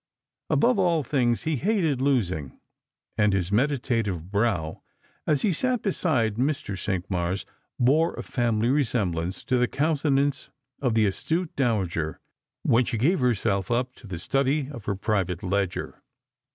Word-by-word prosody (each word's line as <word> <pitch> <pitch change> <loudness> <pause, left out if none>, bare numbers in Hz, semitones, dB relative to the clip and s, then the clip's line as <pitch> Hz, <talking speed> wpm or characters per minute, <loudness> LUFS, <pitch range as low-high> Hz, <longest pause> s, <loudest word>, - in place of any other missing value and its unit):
Above 235 -2 +3
all 170 -5 +2
things 120 -3 +1
he 155 -2 0
hated 165 - +1
losing, 95 - 0 0.6
and 105 -1 +4
his 95 -1 0
meditative 115 - 0
brow, 100 -7 0 0.5
as 150 -3 +2
he 200 - +3
sat 250 - 0
beside 130 - +1
Mr. 135 -4 -1
Cinqmars, 95 -1 -2 0.3
bore 150 +7 +3
a - - -5
family 120 -2 0
resemblance 100 - 0
to 125 - +1
the 125 - +3
countenance 145 -1 +1 0.3
of 125 -5 +1
the 110 -1 +4
astute 160 - -1
dowager 95 - 0 0.4
when 120 +2 +4
she 115 - -2
gave 150 - +2
herself 110 -5 +1
up 125 +2 0
to 115 - -14
the 95 -3 -5
study 135 - 0
of 120 -8 -9
her 100 - -1
private 95 -3 -1
ledger. 95 -1 -2
120 Hz, 140 wpm, -26 LUFS, 100-145 Hz, 0.6 s, and